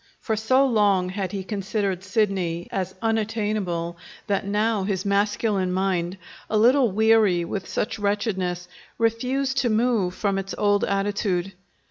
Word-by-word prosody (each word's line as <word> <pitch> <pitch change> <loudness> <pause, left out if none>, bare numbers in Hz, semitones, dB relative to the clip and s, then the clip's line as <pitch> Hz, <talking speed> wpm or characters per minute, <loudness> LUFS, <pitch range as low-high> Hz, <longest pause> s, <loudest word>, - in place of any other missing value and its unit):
For 220 - -1
so 255 +6 +3
long 205 -7 +2
had 190 0 -3
he 195 -2 -4
considered 195 -2 -2
Sidney 190 -5 -1
as 190 -1 -3
unattainable 210 -6 -1 0.3
that 200 -2 -1
now 210 +1 +1
his 190 -1 -2
masculine 200 -1 +1
mind, 185 -1 -1 0.3
a 215 - +1
little 245 +1 +4
weary 215 -4 +3
with 190 +2 -5
much 210 - -1
wretchedness, 190 -4 -1 0.3
refused 255 +4 0
to 255 -3 +1
move 220 -5 +1
from 200 -2 0
its 195 0 -5
old 205 0 +2
attitude. 195 -2 -1
200 Hz, 135 wpm, -24 LUFS, 190-220 Hz, 0.3 s, little